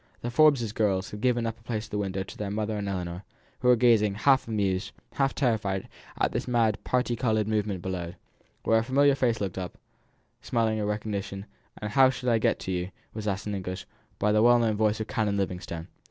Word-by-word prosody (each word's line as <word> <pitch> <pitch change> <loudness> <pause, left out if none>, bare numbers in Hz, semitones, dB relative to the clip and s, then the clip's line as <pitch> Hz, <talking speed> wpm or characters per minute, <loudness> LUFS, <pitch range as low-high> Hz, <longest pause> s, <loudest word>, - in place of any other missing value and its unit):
The 120 - -3
Forbes 135 -5 +4
girls 100 -4 0
had 105 - -7
given 120 -1 +2 0.2
place 115 -1 -3
at 110 - -17
the 105 - -1
window 95 -1 -2
to 95 - -11
their 105 -1 -4
mother 105 +1 -2
and 100 -1 -3
Ellinor, 90 -2 -4 0.4
who - - 0
were 125 - +7
gazing 110 -4 +4
half 135 +5 +3
amused, 100 -3 -1 0.2
half 135 -1 +1
terrified, 105 -7 0 0.3
at - - +1
the - - -1
mad 115 -3 +2
parti 125 -1 0
coloured 110 -3 +1
movement 105 -4 -1
below; 90 -2 -4 0.5
when 115 0 +4
a - - +1
familiar 140 +4 +4
face 120 -4 +1
looked 95 -2 -3
up, 90 -1 -6 0.6
smiling 115 -2 0
a 105 - -1
recognition; 105 -2 -3 0.3
and 105 0 -4
"How 130 +3 +6
shall 125 -1 -1
I 115 - +3
get - - +2
to 95 - -4
you?" 90 0 -2 0.2
was 110 -1 -5
asked 100 0 -2
in 105 - -3
English, 95 -1 -4 0.3
by 105 - +2
the 105 0 +4
well 120 +1 +6
known 115 -2 +2
voice 110 0 +1
of 110 - -2
Canon 105 -4 -1
Livingstone. 90 -4 -3
105 Hz, 210 wpm, -27 LUFS, 100-120 Hz, 0.6 s, were